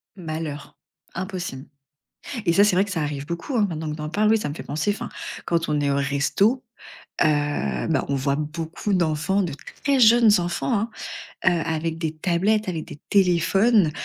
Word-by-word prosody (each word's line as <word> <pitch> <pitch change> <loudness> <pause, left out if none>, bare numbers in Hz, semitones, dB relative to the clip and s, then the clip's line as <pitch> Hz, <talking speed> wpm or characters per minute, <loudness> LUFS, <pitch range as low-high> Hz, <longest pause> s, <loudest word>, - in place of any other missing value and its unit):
Malheur. 155 -4 -6 0.4
Impossible 185 -7 -5 0.8
et 170 - +3
ça, 200 - +6
c'est 205 -3 +3
vrai 195 - +4
que 200 - -7
ça 165 - -1
arrive 145 -1 -3
beaucoup, 170 - -3
hein, 210 - +4
maintenant 160 -3 -4
que 150 - -5
tu - - -7
en 150 - -3
parles, 210 +5 +2
oui, 225 - +5
ça - - -3
me 145 - -4
fait - - -7
penser, 150 +8 -1
enfin, 205 - -5 0.4
quand 165 -1 0
on 150 -1 0
est 140 -1 +1
au 140 - +1
resto, 145 - +1 0.6
heu, 145 - 0
bah, - - +1
on 140 - 0
voit 140 +1 0
beaucoup 160 +6 -3
d'enfants, 170 +2 +1
de 170 - -2 0.3
très 280 -2 +3
jeunes 230 -1 +7
enfants, 175 +7 -1
hein, 225 - -3 0.5
heu, - - +6
avec 160 0 -2
des 160 -2 -2
tablettes, 190 +5 +1
avec 165 -3 -3
des 150 -3 -11
téléphones, 195 +1 +4
170 Hz, 190 wpm, -23 LUFS, 150-200 Hz, 0.8 s, jeunes